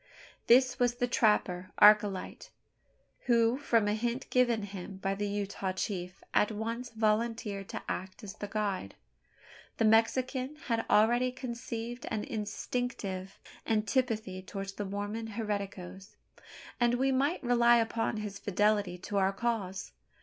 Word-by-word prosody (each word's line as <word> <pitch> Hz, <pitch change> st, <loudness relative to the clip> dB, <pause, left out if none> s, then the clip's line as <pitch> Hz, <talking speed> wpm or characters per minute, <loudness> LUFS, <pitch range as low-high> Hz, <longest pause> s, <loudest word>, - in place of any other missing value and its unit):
This 255 Hz, +2 st, +5 dB
was 245 Hz, -1 st, +2 dB
the 245 Hz, -, 0 dB
trapper, 185 Hz, -6 st, +2 dB
Archilete, 210 Hz, -2 st, +4 dB, 0.8 s
who, 235 Hz, +1 st, +3 dB
from 230 Hz, -7 st, +2 dB
a 205 Hz, -, +2 dB
hint 240 Hz, +4 st, -2 dB
given 240 Hz, -4 st, +3 dB
him 195 Hz, -1 st, -7 dB
by 195 Hz, 0 st, -1 dB
the 205 Hz, +1 st, -2 dB
Utah 200 Hz, -2 st, -2 dB
chief, 180 Hz, -2 st, -4 dB
at 210 Hz, -, +3 dB
once 230 Hz, +3 st, -4 dB
volunteered 220 Hz, -2 st, -1 dB
to -, -, -5 dB
act 190 Hz, +5 st, -5 dB
as 195 Hz, -2 st, -7 dB
the 205 Hz, -, -6 dB
guide. 200 Hz, -, -2 dB, 0.8 s
The 225 Hz, -, +2 dB
Mexican 255 Hz, +5 st, +2 dB
had 230 Hz, -1 st, -1 dB
already 240 Hz, +4 st, +4 dB
conceived 240 Hz, -1 st, -6 dB
an 215 Hz, -, -2 dB
instinctive 210 Hz, -5 st, -4 dB, 0.3 s
antipathy 220 Hz, -3 st, 0 dB
towards 195 Hz, +1 st, -6 dB
the 205 Hz, +1 st, -5 dB
Mormon 205 Hz, +3 st, -4 dB
"hereticos;" 200 Hz, -3 st, -5 dB, 0.6 s
and 240 Hz, 0 st, +3 dB
we 265 Hz, +2 st, +2 dB
might 280 Hz, +6 st, +1 dB
rely 240 Hz, -1 st, +5 dB
upon 225 Hz, 0 st, 0 dB
his 210 Hz, -2 st, -5 dB
fidelity 205 Hz, -2 st, +1 dB
to 200 Hz, +3 st, -4 dB
our 190 Hz, 0 st, +3 dB
cause. 195 Hz, -3 st, -3 dB
215 Hz, 135 wpm, -31 LUFS, 200-240 Hz, 0.8 s, This